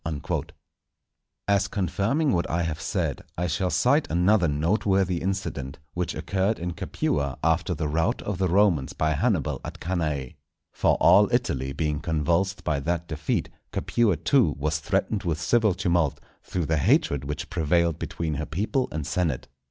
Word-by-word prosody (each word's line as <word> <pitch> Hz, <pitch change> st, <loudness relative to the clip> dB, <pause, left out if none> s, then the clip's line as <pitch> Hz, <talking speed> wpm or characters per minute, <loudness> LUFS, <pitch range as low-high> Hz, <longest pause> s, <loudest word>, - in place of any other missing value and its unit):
_" 75 Hz, -4 st, -3 dB, 1.0 s
As 100 Hz, 0 st, +3 dB
confirming 100 Hz, -, 0 dB
what 85 Hz, -2 st, 0 dB
I 85 Hz, +1 st, 0 dB
have 80 Hz, -2 st, -3 dB
said, -, -, -2 dB, 0.2 s
I 90 Hz, -, 0 dB
shall 90 Hz, +2 st, 0 dB
cite 125 Hz, -, +2 dB
another 90 Hz, +2 st, +3 dB
noteworthy 90 Hz, +4 st, +1 dB
incident, 90 Hz, -8 st, -3 dB, 0.2 s
which 90 Hz, -1 st, -2 dB
occurred 100 Hz, +3 st, 0 dB
in 85 Hz, +1 st, -4 dB
Capua 70 Hz, -4 st, -2 dB
after 80 Hz, +3 st, +1 dB
the 75 Hz, 0 st, -2 dB
rout 80 Hz, +2 st, 0 dB
of 100 Hz, -3 st, -3 dB
the 95 Hz, -, +2 dB
Romans 90 Hz, -7 st, +2 dB
by 80 Hz, 0 st, 0 dB
Hannibal 75 Hz, -, 0 dB
at -, -, -7 dB
Cannæ. 75 Hz, -7 st, -2 dB, 0.4 s
For -, -, +2 dB
all -, -, +5 dB
Italy 65 Hz, +1 st, 0 dB
being 75 Hz, +1 st, -1 dB
convulsed 85 Hz, +4 st, 0 dB
by 75 Hz, -4 st, 0 dB
that 85 Hz, +4 st, -2 dB
defeat, 75 Hz, -2 st, -2 dB, 0.2 s
Capua 110 Hz, -8 st, +1 dB
too 85 Hz, -, +3 dB
was 75 Hz, +1 st, -1 dB
threatened 100 Hz, +7 st, 0 dB
with 80 Hz, -4 st, -2 dB
civil 110 Hz, 0 st, +2 dB
tumult, 85 Hz, -6 st, +1 dB, 0.2 s
through 90 Hz, -3 st, -3 dB
the 80 Hz, +1 st, +1 dB
hatred 70 Hz, 0 st, +2 dB
which 75 Hz, +1 st, -5 dB
prevailed 85 Hz, -1 st, +1 dB
between 80 Hz, -2 st, -3 dB
her 75 Hz, +1 st, -3 dB
people 110 Hz, -, -1 dB
and 75 Hz, -2 st, -3 dB
senate. 80 Hz, -7 st, -1 dB
85 Hz, 160 wpm, -26 LUFS, 75-95 Hz, 1.0 s, all